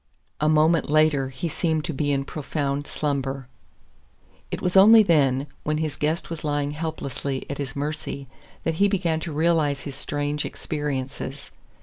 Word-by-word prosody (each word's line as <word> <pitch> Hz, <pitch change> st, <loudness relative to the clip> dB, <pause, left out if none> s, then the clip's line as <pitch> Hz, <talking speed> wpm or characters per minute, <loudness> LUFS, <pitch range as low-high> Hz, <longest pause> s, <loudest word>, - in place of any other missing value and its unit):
A 150 Hz, -, +2 dB
moment 155 Hz, 0 st, +3 dB
later 150 Hz, -3 st, +3 dB
he 130 Hz, +6 st, -4 dB
seemed 160 Hz, 0 st, 0 dB
to 165 Hz, -, -3 dB
be 145 Hz, +1 st, 0 dB
in 140 Hz, -1 st, +1 dB
a -, -, -6 dB
profound 145 Hz, -1 st, -3 dB
slumber. 135 Hz, -3 st, -2 dB, 1.0 s
It -, -, -3 dB
was 180 Hz, +1 st, -1 dB
only 215 Hz, +3 st, +9 dB
then, 140 Hz, -7 st, +3 dB, 0.2 s
when 150 Hz, 0 st, -1 dB
his 155 Hz, -2 st, -2 dB
guest 155 Hz, +3 st, -1 dB
was 165 Hz, -, -5 dB
lying 145 Hz, -1 st, 0 dB
helplessly 145 Hz, -3 st, -4 dB
at 140 Hz, -, -5 dB
his 135 Hz, -3 st, -4 dB
mercy, 145 Hz, -1 st, -4 dB, 0.4 s
that 165 Hz, -, 0 dB
he 200 Hz, -, +7 dB
began 175 Hz, -5 st, 0 dB
to 160 Hz, +1 st, -5 dB
realize 155 Hz, -3 st, +2 dB
his 140 Hz, -, -6 dB
strange 145 Hz, +1 st, -2 dB
experiences. 140 Hz, -2 st, -4 dB
150 Hz, 160 wpm, -24 LUFS, 140-160 Hz, 1.0 s, only